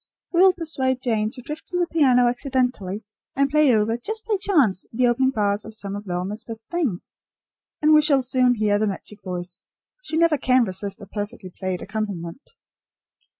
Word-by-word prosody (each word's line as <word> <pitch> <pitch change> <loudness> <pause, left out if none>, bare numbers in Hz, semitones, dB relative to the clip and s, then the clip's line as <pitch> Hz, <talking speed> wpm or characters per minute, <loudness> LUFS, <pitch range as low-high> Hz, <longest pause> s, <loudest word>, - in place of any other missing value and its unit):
We 345 - +4
will 380 0 +7
persuade 265 -7 -1
Jane 220 -4 0
to 250 - -9
drift 300 +5 -7
to 360 - -2
the 350 - +2
piano 265 -7 +3
accidentally 245 -6 -1 0.3
and 275 0 +2
play 300 -2 +5
over, 220 +2 +1
just 440 - -5
by 435 -2 +1
chance, 270 - +2
the 250 +2 +1
opening 245 +2 +3
bars 205 -4 0
of 220 - -8
some 200 -2 -5
of 205 +1 -7
Velma's 185 +4 -3
best 225 -1 -8
things, 295 - -2 0.7
and 305 +1 +6
we 305 - +7
shall 285 -4 +4
soon 250 -1 +3
hear 210 -2 +1
the 215 - +1
magic 205 +1 -6
voice. 180 -1 -6 0.3
She 320 - -3
never 330 -3 +3
can 255 -1 +3
resist 200 +1 -3
a - - -8
perfectly 205 -2 -6
played 185 -1 -4
accompaniment." 200 -1 -5
240 Hz, 185 wpm, -23 LUFS, 205-280 Hz, 0.7 s, will